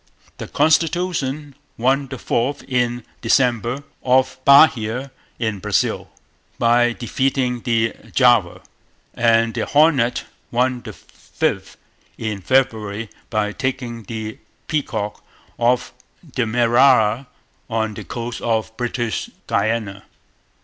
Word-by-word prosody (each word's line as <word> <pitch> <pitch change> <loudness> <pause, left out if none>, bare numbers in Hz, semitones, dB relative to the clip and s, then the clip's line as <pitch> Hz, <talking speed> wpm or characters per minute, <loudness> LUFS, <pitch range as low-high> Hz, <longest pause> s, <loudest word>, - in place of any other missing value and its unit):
The - - -5
Constitution 155 -3 +1 0.2
won 135 +4 +1
the 130 - -7
fourth 125 +4 -1
in 120 -2 -1 0.2
December, 120 +2 +1 0.2
off 130 0 +2
Bahia 130 -3 +5 0.3
in 110 -4 -2
Brazil, - - 0 0.5
by 120 0 +3
defeating 125 0 -1
the 115 -1 +1 0.2
Java. 120 -9 +3 0.5
And 115 -1 +3
the - - -2
Hornet 145 -5 +3 0.3
won 125 +1 0
the - - -8
fifth - - -4 0.4
in 105 -3 -4
February, 110 -3 0 0.2
by 105 -2 0
taking 125 -1 -3
the 110 0 -6 0.3
Peacock, 110 -9 -3 0.4
off 125 +1 +1 0.3
Demerara, 120 -1 +3 0.4
on 110 -1 -1
the - - -7
coast 120 0 -5
of 110 -1 -1
British 120 -2 -2 0.2
Guiana. 105 -3 -1
120 Hz, 100 wpm, -20 LUFS, 115-130 Hz, 0.5 s, Bahia